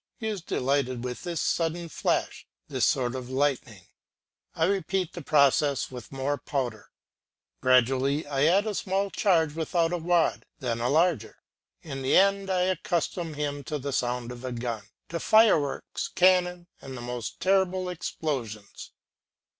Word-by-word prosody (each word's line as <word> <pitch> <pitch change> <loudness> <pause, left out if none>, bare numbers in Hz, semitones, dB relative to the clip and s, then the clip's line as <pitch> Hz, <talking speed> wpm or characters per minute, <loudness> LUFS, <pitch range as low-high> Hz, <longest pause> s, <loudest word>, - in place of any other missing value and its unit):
He 220 - -4
is 205 -4 -4
delighted 130 -5 -1
with 125 -1 -5
this 170 -3 -3
sudden 170 +1 -1
flash, - - -2 0.2
this - - +1
sort 125 -2 +1
of 130 -1 -6
lightning; 130 -7 -1 0.7
I 160 - +2
repeat 190 -1 -1
the 175 - -7
process 140 -1 +3
with 125 -3 -9
more 135 +1 -2
powder; 120 -8 -3 0.7
gradually 130 +3 +3
I 140 0 +1
add 195 +5 +4
a 215 - -2
small 195 0 -1
charge 165 -6 +2
without 165 +1 0
a 175 - -1
wad, 170 0 +1
then 120 -4 -3
a 120 - +1
larger; 155 - +1 0.5
in 135 -4 -6
the 130 - +3
end 195 0 +3
I 185 -1 +1
accustom 175 -2 -1
him 145 -1 -3
to 150 - -3
the 140 0 -4
sound 125 -1 -1
of 125 0 -9
a 130 - -4
gun, 115 -2 -4 0.2
to 170 - -3
fireworks, 210 -12 +3
cannon, 180 -1 +3 0.2
and 130 -1 -8
the - - -7
most 120 -1 -5
terrible 185 -1 +2
explosions. 130 - -5
145 Hz, 155 wpm, -27 LUFS, 130-180 Hz, 0.7 s, add